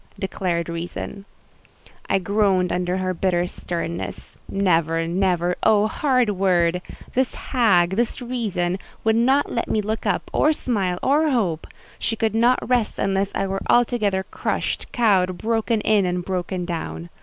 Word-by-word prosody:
_" -, -, -17 dB
declared 180 Hz, -3 st, -2 dB
Reason. 175 Hz, +4 st, -6 dB, 0.8 s
I 195 Hz, -, +3 dB
groaned 190 Hz, -2 st, +1 dB
under 180 Hz, +1 st, -1 dB
her 185 Hz, 0 st, -1 dB
bitter 175 Hz, 0 st, +1 dB
sternness. 170 Hz, -1 st, -5 dB
Never—never—oh, 180 Hz, +3 st, +2 dB
hard 255 Hz, -5 st, +2 dB
word! 180 Hz, -3 st, +2 dB, 0.3 s
This 260 Hz, 0 st, 0 dB
hag, 190 Hz, -9 st, +2 dB
this 230 Hz, +6 st, -1 dB
Reason, 210 Hz, -8 st, -2 dB, 0.2 s
would 220 Hz, 0 st, +3 dB
not 265 Hz, +5 st, +3 dB
let 235 Hz, -, -2 dB
me 220 Hz, -, +1 dB
look 215 Hz, +2 st, -2 dB
up, -, -, -1 dB
or 305 Hz, -, +3 dB
smile, 195 Hz, -11 st, -1 dB
or 300 Hz, +4 st, +3 dB
hope: 190 Hz, -, 0 dB, 0.3 s
she 225 Hz, -, -1 dB
could 220 Hz, -1 st, 0 dB
not 240 Hz, +3 st, +2 dB
rest 245 Hz, -4 st, +1 dB
unless 195 Hz, 0 st, 0 dB
I -, -, 0 dB
were 195 Hz, 0 st, -3 dB
altogether 220 Hz, -6 st, +2 dB
crushed, -, -, -3 dB
cowed, 190 Hz, -6 st, +2 dB
broken 225 Hz, 0 st, 0 dB
in, 205 Hz, -4 st, +3 dB
and 180 Hz, 0 st, -2 dB
broken 180 Hz, -1 st, -2 dB
down. 170 Hz, 0 st, -5 dB
195 Hz, 145 wpm, -22 LUFS, 180-225 Hz, 0.8 s, I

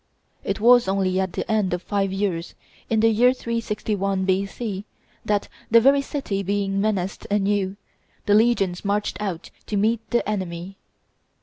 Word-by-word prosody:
It -, -, -2 dB
was 240 Hz, 0 st, +6 dB
only 190 Hz, -1 st, +1 dB
at 190 Hz, -2 st, -1 dB
the -, -, -3 dB
end 205 Hz, -5 st, +1 dB
of 180 Hz, -, -8 dB
five 195 Hz, -2 st, -1 dB
years, 190 Hz, -4 st, -2 dB, 0.3 s
in 220 Hz, -1 st, +2 dB
the 225 Hz, -, +5 dB
year 240 Hz, +3 st, +4 dB
361 210 Hz, -5 st, -2 dB
B.C., 195 Hz, +2 st, -2 dB, 0.4 s
that, 205 Hz, -1 st, 0 dB, 0.2 s
the 230 Hz, -, +7 dB
very 275 Hz, +4 st, +5 dB
city 270 Hz, -9 st, -3 dB
being 195 Hz, 0 st, -1 dB
menaced 195 Hz, -3 st, -2 dB
anew, 200 Hz, -1 st, 0 dB, 0.5 s
the 205 Hz, -, +3 dB
legions 205 Hz, -5 st, +2 dB
marched 205 Hz, -1 st, -1 dB
out 190 Hz, -4 st, -4 dB, 0.2 s
to 210 Hz, -, -1 dB
meet 220 Hz, +3 st, +2 dB
the 240 Hz, -, 0 dB
enemy. 185 Hz, -2 st, -4 dB
200 Hz, 150 wpm, -23 LUFS, 190-220 Hz, 0.5 s, the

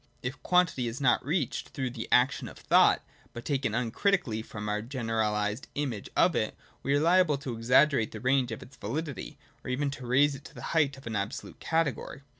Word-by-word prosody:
If 130 Hz, +2 st, -4 dB
quantity 180 Hz, -9 st, +2 dB
is 115 Hz, +2 st, -4 dB
not 130 Hz, -4 st, +3 dB
reached 150 Hz, -1 st, -1 dB
through 130 Hz, -4 st, -3 dB
the 115 Hz, -2 st, -6 dB
action 125 Hz, +3 st, +3 dB
of -, -, -11 dB
thought, -, -, +4 dB, 0.3 s
but 120 Hz, -, -8 dB
taken 135 Hz, -6 st, 0 dB
uncritically 125 Hz, -, 0 dB
from 105 Hz, -1 st, -7 dB
our 105 Hz, 0 st, -1 dB
general 115 Hz, -3 st, -1 dB
ised 105 Hz, +4 st, -2 dB
image 130 Hz, -8 st, -3 dB
of -, -, +4 dB
it, -, -, -1 dB, 0.2 s
we 140 Hz, -, +1 dB
are -, -, +3 dB
liable 170 Hz, -1 st, +4 dB
to 135 Hz, -4 st, -5 dB
exaggerate 125 Hz, +1 st, +3 dB
the -, -, -7 dB
range 130 Hz, -1 st, +2 dB
of 110 Hz, -, -6 dB
its 140 Hz, -, -15 dB
validity, 145 Hz, +7 st, -5 dB, 0.3 s
or -, -, -6 dB
even 140 Hz, +2 st, 0 dB
to 130 Hz, -3 st, -8 dB
raise 140 Hz, +4 st, +4 dB
it 140 Hz, 0 st, -9 dB
to -, -, -12 dB
the -, -, -9 dB
height 145 Hz, -4 st, +2 dB
of 135 Hz, -, -14 dB
an 110 Hz, -2 st, -4 dB
absolute 100 Hz, 0 st, -4 dB
cate 160 Hz, -4 st, +1 dB
gory. 135 Hz, -, -9 dB
130 Hz, 210 wpm, -29 LUFS, 115-145 Hz, 0.3 s, thought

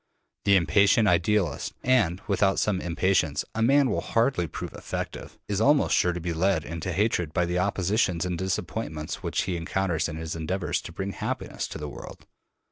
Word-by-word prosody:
The 100 Hz, -, +5 dB
impatient 100 Hz, +6 st, +4 dB
idealist 90 Hz, 0 st, +1 dB
and 105 Hz, -8 st, +2 dB
without 100 Hz, -1 st, +2 dB
some 95 Hz, -3 st, +1 dB
impatience 85 Hz, -3 st, +1 dB
a 115 Hz, -, -2 dB
man 135 Hz, +2 st, +4 dB
will -, -, 0 dB
hardly 115 Hz, -7 st, +1 dB
prove -, -, -6 dB
effective -, -, -6 dB
is 105 Hz, 0 st, -1 dB
almost 145 Hz, +5 st, +4 dB
sure 90 Hz, -, +3 dB
to 90 Hz, -, -4 dB
be 85 Hz, 0 st, -3 dB
led 90 Hz, 0 st, +1 dB
into 85 Hz, +3 st, -4 dB
hatred 90 Hz, -4 st, 0 dB
by 90 Hz, -1 st, +2 dB
the 90 Hz, +1 st, -1 dB
oppositions 95 Hz, -2 st, +1 dB
and 90 Hz, -1 st, -2 dB
disappointments 80 Hz, -4 st, -3 dB
which -, -, -1 dB
he 95 Hz, -, -2 dB
encounters 85 Hz, 0 st, -1 dB
in 75 Hz, -, -5 dB
his 80 Hz, 0 st, -5 dB
endeavors 85 Hz, +3 st, -2 dB
to -, -, -9 dB
bring 95 Hz, +3 st, -4 dB
happiness -, -, -4 dB
to -, -, -7 dB
the 75 Hz, -1 st, -5 dB
world. -, -, -10 dB
90 Hz, 180 wpm, -26 LUFS, 85-100 Hz, -, The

